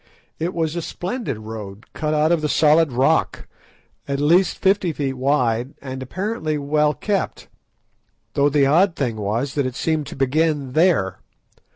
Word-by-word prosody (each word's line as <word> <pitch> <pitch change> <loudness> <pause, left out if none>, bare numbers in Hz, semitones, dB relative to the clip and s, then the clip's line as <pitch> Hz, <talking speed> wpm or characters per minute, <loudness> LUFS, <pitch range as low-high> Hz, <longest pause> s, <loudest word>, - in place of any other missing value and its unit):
It 170 +3 -2
was 160 -1 -1
a 170 - -2
splendid 190 - -4
road 110 -1 -8
cut 155 0 -1
out 155 +2 +2
of 170 -2 +2
the 150 - -1
solid 155 0 +4
rock, 135 +6 +1 0.6
at 140 0 -2
least 170 +6 +3
fifty 195 -2 +2
feet 140 -2 -2
wide, 130 -2 0
and 130 -1 -7
apparently 160 - -3
well 150 +1 +1
kept; 205 -2 -2 0.9
though 140 +1 +3
the 145 -1 +3
odd 170 +6 +3
thing 125 -5 -1
was 110 +6 -2
that 140 -3 0
it 125 - -6
seemed 155 -1 -1
to - - -8
begin 140 0 0
there. 140 - +2
150 Hz, 160 wpm, -21 LUFS, 130-165 Hz, 0.9 s, solid